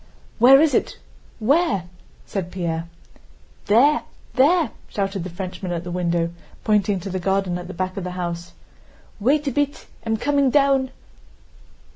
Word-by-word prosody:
"Where 260 +4 +8
is 305 -2 +4
it? - - 0 0.4
Where?" 275 - +2 0.4
said 185 -3 -4
Pierre. 170 -2 -3 0.8
"There! 270 +9 +5 0.3
There!" 300 +1 +4 0.2
shouted 195 -2 -2
the 185 - -5
Frenchman 185 +1 -5
at 170 0 -3
the 175 - -6
window, 170 -1 0 0.3
pointing 205 -2 +2
to 195 - -5
the 185 - -2
garden 190 -1 0
at 175 - -8
the 190 - -8
back 185 +1 -3
of 195 - -3
the 180 - -3
house. 175 -1 -5 0.7
"Wait 285 +7 +2
a - - +1
bit—I'm 270 -5 -2
coming 280 +2 +2
down." 275 -1 +3
195 Hz, 145 wpm, -22 LUFS, 180-270 Hz, 0.8 s, Where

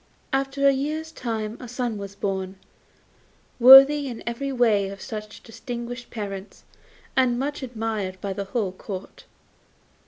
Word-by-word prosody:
After 275 +1 +1
a - - +7
year's 310 +4 -3
time 225 -5 -4
a 250 - -8
son 245 -3 -3
was 200 0 -8
born, 190 -1 -3 1.0
worthy 270 +3 +9
in 240 -3 -7
every 235 +4 -3
way 220 -6 +2
of 195 0 -9
such 215 0 -8
distinguished 240 +1 -7
parents, 200 -3 -7 0.5
and 255 -2 +3
much 290 +3 -3
admired 220 -6 -4
by 195 0 -4
the 200 +1 -4
whole 200 -2 -2
Court. 190 0 -9
235 Hz, 135 wpm, -24 LUFS, 200-265 Hz, 1.0 s, worthy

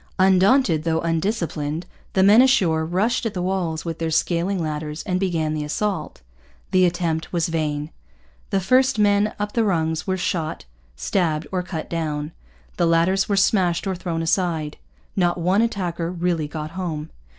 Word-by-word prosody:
Undaunted 190 - +4
though 160 -1 +1
undisciplined, 165 -3 -2 0.3
the 190 - +3
men 210 +5 +7
ashore 185 -12 +3
rushed 190 +9 0
at 210 - -6
the 180 - -2
walls 180 -4 -2
with 165 -1 -4
their 165 -1 -1
scaling 175 +4 +1
ladders 150 -1 -4
and 185 -3 -1
began 165 -5 0
the 155 -1 -2
assault. 195 - -3 0.5
The 185 0 +5
attempt 170 -2 -2
was 170 -1 0
vain. 150 -1 -2 0.6
The 195 - +1
first 255 +6 +3
men 205 0 +3
up 205 0 -3
the 230 - +1
rungs 160 -5 0
were 190 0 0
shot, 165 - -2 0.3
stabbed, 160 - 0
or 185 -1 0
cut 175 -3 -5
down. 155 -2 -3 0.5
The 170 - +2
ladders 170 +4 +2
were 200 - +1
smashed 185 -3 +2
or 195 - -1
thrown 170 -2 -3
aside. 160 -3 0 0.4
Not 175 -2 +2
one 180 +5 +2
attacker 175 -7 -2
really 170 -3 -1
got 155 +1 -6
home. 165 -4 -4
175 Hz, 160 wpm, -22 LUFS, 160-190 Hz, 0.6 s, men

